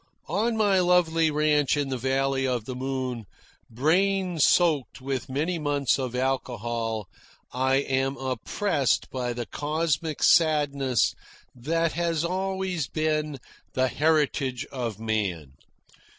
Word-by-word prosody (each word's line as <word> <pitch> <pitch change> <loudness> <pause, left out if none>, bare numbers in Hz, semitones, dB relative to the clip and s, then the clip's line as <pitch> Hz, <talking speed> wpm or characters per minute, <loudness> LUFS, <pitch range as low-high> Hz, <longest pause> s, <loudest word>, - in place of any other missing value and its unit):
On 220 +7 0
my 205 -3 +3
lovely 170 -3 +3
ranch 150 -1 +2
in 145 -2 -1
the 130 - -1
Valley 135 +1 0
of 125 -4 -1
the 130 - -5
Moon, 130 -3 -3 0.4
brain 180 - +1
soaked 155 -4 +3
with 130 -1 -4
many 160 +6 -1
months 145 -3 +1
of 125 -2 -3
alcohol, 120 -4 -2 0.5
I 130 +1 +2
am 135 0 0
oppressed 135 - -1
by 125 -2 -2
the 120 0 -4
cosmic 155 +1 -2
sadness 145 -6 +3 0.4
that 165 +6 0
has 170 -1 -1
always 190 -3 -2
been 155 -2 -1 0.4
the 130 0 +1
heritage 145 -4 +1
of 120 -6 -4
man. 100 -11 -2
140 Hz, 120 wpm, -26 LUFS, 130-160 Hz, 0.5 s, my